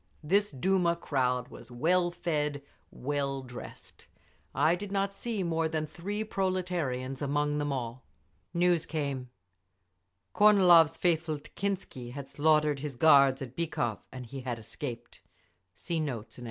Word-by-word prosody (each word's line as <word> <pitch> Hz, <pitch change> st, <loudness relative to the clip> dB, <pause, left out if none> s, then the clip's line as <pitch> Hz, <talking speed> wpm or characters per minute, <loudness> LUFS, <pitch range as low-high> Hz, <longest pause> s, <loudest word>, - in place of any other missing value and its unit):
This 200 Hz, +6 st, +2 dB
Duma 170 Hz, +4 st, +1 dB
crowd 125 Hz, -6 st, -1 dB
was 120 Hz, -, -12 dB
well 175 Hz, +8 st, +2 dB
fed, 150 Hz, -5 st, -2 dB, 0.3 s
well 140 Hz, 0 st, -2 dB
dressed; 125 Hz, -1 st, -11 dB, 0.5 s
I 160 Hz, -, +4 dB
did 195 Hz, +3 st, -4 dB
not 195 Hz, 0 st, 0 dB
see 215 Hz, -1 st, -3 dB
more 165 Hz, -2 st, 0 dB
than 155 Hz, -1 st, -1 dB
three 200 Hz, +7 st, -4 dB
proletarians 180 Hz, -11 st, -2 dB
among 145 Hz, +1 st, 0 dB
them 145 Hz, -1 st, -1 dB
all…. 125 Hz, -1 st, -4 dB, 0.5 s
News 175 Hz, -1 st, +2 dB
came. 140 Hz, -5 st, -3 dB, 1.0 s
Kornilov's 175 Hz, -6 st, +6 dB
faithful 160 Hz, -3 st, +1 dB
Tekhintsi 155 Hz, -6 st, -5 dB
had 140 Hz, -1 st, -7 dB
slaughtered 150 Hz, 0 st, +2 dB
his 145 Hz, -2 st, -5 dB
guards 140 Hz, -1 st, +5 dB
at 130 Hz, -1 st, -9 dB
Bykhov, 120 Hz, -9 st, -2 dB
and 130 Hz, -1 st, -7 dB
he 135 Hz, +4 st, -7 dB
had 125 Hz, -2 st, -3 dB
escaped. 120 Hz, +1 st, -7 dB
150 Hz, 125 wpm, -30 LUFS, 135-175 Hz, 1.0 s, Kornilov's